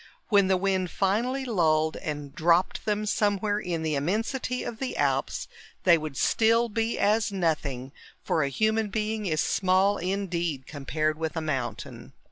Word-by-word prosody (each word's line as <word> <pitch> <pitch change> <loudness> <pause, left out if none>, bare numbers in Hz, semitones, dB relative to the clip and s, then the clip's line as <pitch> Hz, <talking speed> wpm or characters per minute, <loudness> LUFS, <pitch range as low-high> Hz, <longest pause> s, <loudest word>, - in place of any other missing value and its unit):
When 200 -3 +5
the 190 0 +3
wind 190 -1 0
finally 235 +9 0
lulled 160 -8 +2
and 145 -2 -5
dropped 170 +3 +2
them 210 0 0
somewhere 205 0 +1
in 170 -5 -3
the 155 -1 0
immensity 225 - -1
of 230 - -6
the 265 - -3
Alps, - - 0 0.4
they 175 -2 +7
would 155 -4 -5
still 230 +1 +3
be 225 +2 -1
as 215 +1 +2
nothing, 150 -8 -1 0.3
for 160 - +1
a 140 - +1
human 220 +7 +1
being 215 0 -2
is 155 -2 +1
small 190 +2 +2
indeed 175 -7 -2
compared 155 +2 -2
with 160 0 -3
a - - 0
mountain. 135 -6 -4
185 Hz, 155 wpm, -27 LUFS, 155-215 Hz, 0.4 s, they